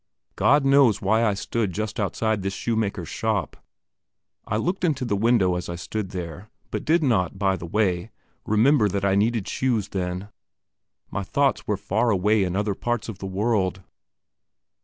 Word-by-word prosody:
God 145 0 +4
knows 135 -6 +5
why 110 +4 +2
I 105 -3 +2
stood 105 -1 -2
just 110 +3 -3
outside 110 +1 0
this 95 0 -3
shoemaker's 105 -7 -2
shop. 110 -3 -2 0.9
I 105 - 0
looked 180 - -2
into 145 -7 +1
the 105 - 0
window 105 -3 +3
as 90 0 -4
I 85 - -3
stood 95 +3 -4
there, 90 +1 -7 0.2
but - - -3
did 165 +1 +3
not, 100 - +1
by 95 -1 +1
the 85 -2 -7
way, 90 -2 0 0.3
remember 110 +1 +3
that 100 0 -1
I 100 - +3
needed 110 +1 +1
shoes 115 -6 0
then; 90 +1 -3 0.8
my 100 - -2
thoughts 135 +7 0
were 105 - 0
far 100 +4 0
away 105 +1 +3
in 90 -1 -2
other 105 0 0
parts 120 +3 -2
of 105 -3 -7
the 95 - -5
world. 95 -2 0
105 Hz, 170 wpm, -24 LUFS, 95-115 Hz, 0.9 s, knows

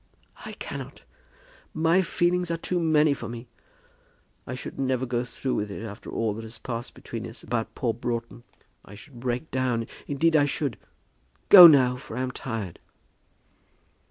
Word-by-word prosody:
"I - - -7
cannot. - - -8 0.7
My 165 +4 +3
feelings 180 0 0
are 165 - -1
too 175 +2 -2
many 155 -2 +3
for 115 -5 -7
me. 120 +1 -8 1.0
I 130 - -4
should 125 - -8
never 130 -1 0
go 120 -1 -1
through 130 +1 -4
with 105 0 -2
it 100 - -7
after 105 -2 -9
all 110 -2 -1
that 110 - -7
has 110 0 -9
passed 115 +1 -6
between 115 0 -7
us 115 - -12
about 115 -2 -3
poor 120 -5 -1
Broughton. 120 0 -4 0.4
I 100 - -13
should 120 +4 -13
break 125 +5 -3
down; 125 -3 0 0.2
indeed 160 +3 +2
I 145 -2 +5
should. 140 -3 -2 0.7
Go 180 -3 +13
now, 130 -5 +5
for 125 - -9
I - - -1
am 130 0 -2
tired." 115 -9 -5
125 Hz, 165 wpm, -26 LUFS, 115-150 Hz, 1.0 s, Go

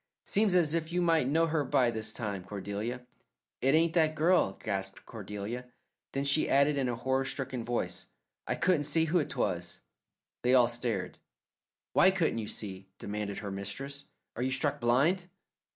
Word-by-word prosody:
Seems 205 -2 +2
as 165 -4 +4
if 165 0 -1
you 180 - 0
might 165 -6 +3
know 160 +4 +3
her 160 -2 0
by 125 -2 +2
this 110 -1 -4
time, 100 -5 -4
Cordelia." 105 +6 -5 0.6
"It 135 +3 +4
ain't 165 +1 +3
that 155 -2 +3
girl," 160 - +3
gasped 95 -1 -4
Cordelia. 105 +3 -6 0.5
Then 135 - 0
she 140 +2 +3
added 140 +2 +4
in 135 -3 0
a 120 - -1
horror 130 +3 0
stricken 130 -3 -3
voice, 120 +1 -3 0.4
"I - - 0
couldn't 170 -5 +2
see 160 +3 +2
who 165 0 +2
'twas." 85 -9 -3 0.6
They 125 +1 +4
all 125 -2 +6
stared. 120 -5 -3 0.7
"Why 190 - +6
couldn't 175 -11 +1
you 110 - -4
see?" 95 -3 -5
demanded 105 -1 -4
her 100 - -3
mistress. 135 +9 -5 0.3
"Are 120 - -4
you 130 - +1
struck 140 +2 0
blind?" 155 +10 +2
130 Hz, 170 wpm, -30 LUFS, 105-155 Hz, 0.7 s, all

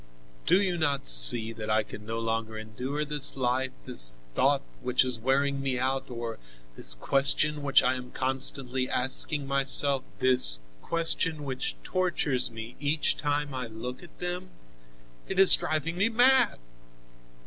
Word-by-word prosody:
"Do 185 - +3
you 185 -4 -2
not 145 -4 -2
see 85 - +7
that 110 -1 -8
I 110 0 +1
can 105 0 -12
no 115 +1 -5
longer 115 -1 -4
endure 125 +7 -6
this 145 -2 +1
life, 130 +1 -2 0.2
this - - 0 0.2
thought - - 0 0.2
which 125 +1 0
is 125 -3 0
wearing 140 +3 -1
me 135 -2 -3
out, 130 +1 -3
or 115 -2 -7 0.4
this - - +1
question 140 - +1
which 140 -1 +2
I 125 0 +1
am 125 -1 -8
constantly 130 0 -2
asking 135 +3 +2
myself, 140 0 +3 0.2
this 125 - +2 0.2
question 165 - 0
which 130 -2 -5
tortures 170 -8 -2
me 115 +1 -10
each 150 +1 -1
time 145 -1 -3
I 130 -2 -6
look 115 +3 -9
at 175 -3 -17
them? 180 +1 -6 0.8
It 190 - -6
is 195 -1 +9
driving 155 +2 -1
me 205 +4 +1
mad." 245 +1 +3
135 Hz, 150 wpm, -26 LUFS, 120-150 Hz, 0.8 s, is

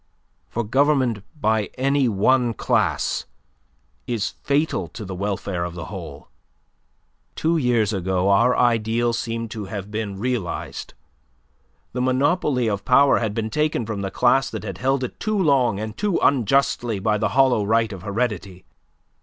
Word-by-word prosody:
For 120 - -2
government 130 -2 +2 0.2
by 110 -4 +1
any 135 0 +2
one 120 +3 +2
class - - 0 0.8
is 115 -4 -2
fatal 140 - 0
to 110 - -9
the 95 - -6
welfare 95 -1 -3
of 85 0 -5
the 85 - -6
whole. 80 -7 -8 1.1
Two 165 +1 +1
years 120 -6 +1
ago 95 0 0
our 120 +6 +4
ideal 115 0 +2
seemed 115 -1 -3
to 110 -3 -5
have 100 +1 -6
been 105 -2 -4
realized. 115 -4 -4 1.0
The 125 - -2
monopoly 130 0 +1
of 100 -2 -2
power 140 +4 +5
had 110 -3 -2
been 110 -1 -2
taken 150 -5 0
from 105 -2 -4
the 95 - -2
class 135 +5 +2
that 110 -4 -6
had 95 -4 -6
held 135 +2 +1
it 125 - -6
too 215 -1 -1
long 135 - +2
and 110 0 -5
too 205 -3 0
unjustly 120 -3 +2
by 105 +2 0
the 110 0 +1
hollow 130 -5 +4
right 110 +1 +1
of 95 - -8
heredity. 100 -3 -3
115 Hz, 155 wpm, -22 LUFS, 100-130 Hz, 1.1 s, power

